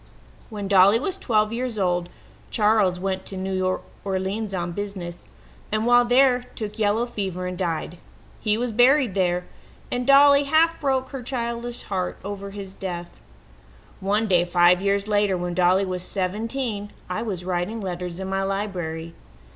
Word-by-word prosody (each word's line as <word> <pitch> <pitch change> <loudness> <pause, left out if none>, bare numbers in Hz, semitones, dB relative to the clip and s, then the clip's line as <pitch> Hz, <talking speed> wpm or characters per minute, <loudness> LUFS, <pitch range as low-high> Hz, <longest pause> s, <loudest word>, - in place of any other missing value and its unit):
"When 205 -3 -5
Dolly 200 +3 +6
was 370 +8 -2
twelve 215 - +1
years 245 -1 -3
old 180 -2 0 0.4
Charles 210 -4 +2
went 190 0 -2
to 195 - -7
New 185 0 -1 0.2
Orleans 195 +2 -2
on 175 -2 -2
business, 185 -3 -6 0.5
and 215 +1 0
while 245 0 +5
there 250 0 +4
took 215 -1 -5
yellow 215 +2 +2
fever 190 -6 -4
and 180 0 -3
died. 170 -1 -3 0.4
He 215 -1 +1
was 240 0 -1
buried 250 0 +4
there, 180 -2 +1 0.5
and 245 +1 -2
Dolly 280 0 +7
half 325 +3 +3
broke 265 -2 0
her 270 -2 -6
childish 235 -1 -4
heart 185 -2 -3
over 200 0 -5
his 195 -1 -8
death. 175 -3 -5 0.9
"One 205 +3 +1
day, 180 -3 +4
five 175 +1 +4
years 200 +1 +1
later, 205 -3 +2
when 175 0 -3
Dolly 185 +2 +3
was 185 -1 -3
seventeen, 205 +4 -3 0.2
I 180 - -3
was 190 -6 -4
writing 185 +5 -2
letters 180 -2 -5
in 190 - -4
my 195 0 -1
library. 180 -5 -3
200 Hz, 155 wpm, -24 LUFS, 185-230 Hz, 0.9 s, Dolly